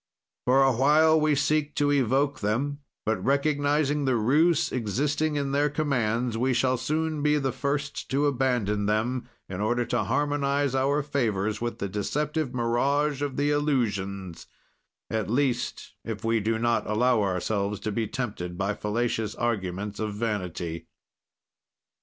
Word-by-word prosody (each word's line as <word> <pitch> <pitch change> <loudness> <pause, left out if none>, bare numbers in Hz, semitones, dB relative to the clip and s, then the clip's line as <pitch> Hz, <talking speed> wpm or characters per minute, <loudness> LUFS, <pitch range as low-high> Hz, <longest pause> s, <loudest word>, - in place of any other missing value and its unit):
"For 135 +2 +5
a 135 - +4
while 155 +5 +4
we 150 -1 +3
seek 150 +1 0
to 145 -1 +2
evoke 140 +1 +1
them; 130 +7 -1 0.3
but 110 -4 -1
recognizing 145 +1 +1
the 130 -2 +2
ruse 145 +9 +3
existing 145 +7 0
in 140 -1 -1
their 145 +1 +2
commands, 125 -6 0
we 130 +1 +1
shall 130 +1 +2
soon 155 +4 -1
be 150 0 +3
the 135 -2 0
first 140 +3 -3
to 140 +2 +1
abandon 120 -7 +1
them, 120 +4 -1 0.2
in 95 +1 -5
order 120 +3 +1
to - - -1
harmonize 145 -1 0
our 140 +2 +1
favors 110 -8 -1
with 120 0 -3
the 100 - -3
deceptive 150 - -2
mirage 135 +4 +1
of 145 -2 -3
the 145 +1 +2
illusions; 100 - -1 0.6
at 110 -4 -1
least, 125 -1 -1
if 110 0 -5
we 115 0 +2
do 110 +2 0
not 115 0 0
allow 120 +1 +3
ourselves 100 +1 -1
to 110 - -2
be 110 +1 -1
tempted 100 -9 -4
by 100 +2 0
fallacious 110 0 -2
arguments 105 -3 -2
of 110 -2 -3
vanity. 90 -6 -3
125 Hz, 145 wpm, -26 LUFS, 110-145 Hz, 0.6 s, For